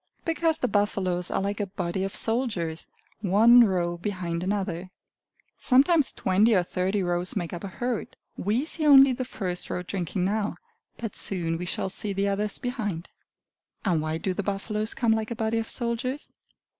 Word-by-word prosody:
Because 325 -1 +1
the 255 - 0
buffaloes 190 -4 0
are - - -1
like 200 +1 -2
a 205 - -1
body 185 -1 -3
of 195 - -4
soldiers, 210 -9 -1 0.3
one 225 +5 +6
row 175 -4 0
behind 175 -3 -3
another. 190 -2 -2 0.7
Sometimes 285 +3 +4
twenty 205 +4 +3
or 180 - +3
thirty 185 +3 -1
rows 175 0 -1
make 175 -4 -3
up 175 - -6
a - - -3
herd. 240 +4 -4 0.2
We 220 +9 0
see 310 -1 -1
only 275 -2 +8
the 255 - -3
first 185 -7 -4
row 180 - -3
drinking 180 0 -2
now, 210 +1 -1 0.4
but 225 -4 -5
soon 170 -4 +1
we 180 - -4
shall 190 - -1
see 200 +1 -3
the 200 +1 0
others 205 +1 -1
behind. 210 -9 -4 0.8
And 170 -5 +2
why 155 +1 -2
do 185 +3 -2
the 205 - -2
buffaloes 210 +2 -2
come 235 -3 +2
like 220 -1 0
a 235 - -3
body 225 0 0
of 225 - -4
soldiers? 250 +4 -2
200 Hz, 175 wpm, -26 LUFS, 180-230 Hz, 0.8 s, only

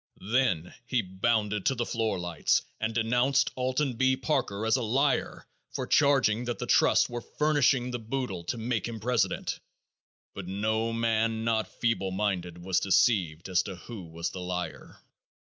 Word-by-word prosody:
Then 100 -7 0
he 125 -3 +1
bounded 105 +2 0
to 135 - +2
the 120 -1 -1
foot 115 -3 -1
lights 85 -3 +1 0.2
and 110 0 -2
denounced 125 +5 +2
Alton 130 +2 0
B. 130 +1 +3
Parker 110 -9 -1
as 110 - +3
a 130 - 0
liar 135 +5 0 0.3
for - - -2
charging 130 -5 +3
that 120 -1 -3
the - - -4
trusts - - +4
were 120 0 -5
furnishing 140 -4 +1
the 120 - -3
boodle 115 -6 -4
to 120 - -2
make 115 -1 -2
him 115 -1 -6
president, 110 -4 0 0.7
but 100 -3 -7
no 110 +4 -1
man 115 -1 0
not 115 -1 +1
feeble 115 -5 -1
minded 95 -3 -2
was 95 0 +1
deceived 95 -5 +2
as 90 -1 +2
to 95 - -7
who 100 +1 -9
was 85 +1 -4
the 95 - -7
liar. 90 0 -5
110 Hz, 160 wpm, -28 LUFS, 95-125 Hz, 0.7 s, trusts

